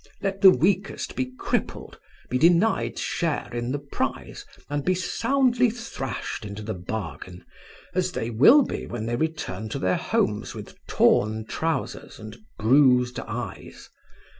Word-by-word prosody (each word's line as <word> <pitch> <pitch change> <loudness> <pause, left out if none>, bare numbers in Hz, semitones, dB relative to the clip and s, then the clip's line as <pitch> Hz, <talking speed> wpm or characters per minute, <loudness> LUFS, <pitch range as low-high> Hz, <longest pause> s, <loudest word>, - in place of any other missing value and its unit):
"Let 195 0 -3
the 195 - +10
weakest 190 +2 0
be 130 0 -2
crippled, - - -3 0.3
be 125 - -1
denied 175 +7 +3
share 160 -7 -2
in 120 +1 -2
the 145 - -1
prize, 140 0 -4 0.2
and 145 0 -2
be 185 +4 +2
soundly 245 +5 +2
thrashed 215 - -5
into 105 0 -7
the 110 +1 -3
bargain, 90 -2 -6 0.5
as 185 0 0
they 115 -6 -3
will 230 - +7
be - - -5
when 115 -2 -5
they 120 +1 -1
return 120 - -3
to - - -3
their 90 0 +1
homes - - -1
with - - -9
torn 110 +1 +2
trousers 165 +7 -3
and 110 0 -9 0.2
bruised 125 +1 +4
eyes. - - -7
135 Hz, 140 wpm, -25 LUFS, 110-185 Hz, 0.5 s, the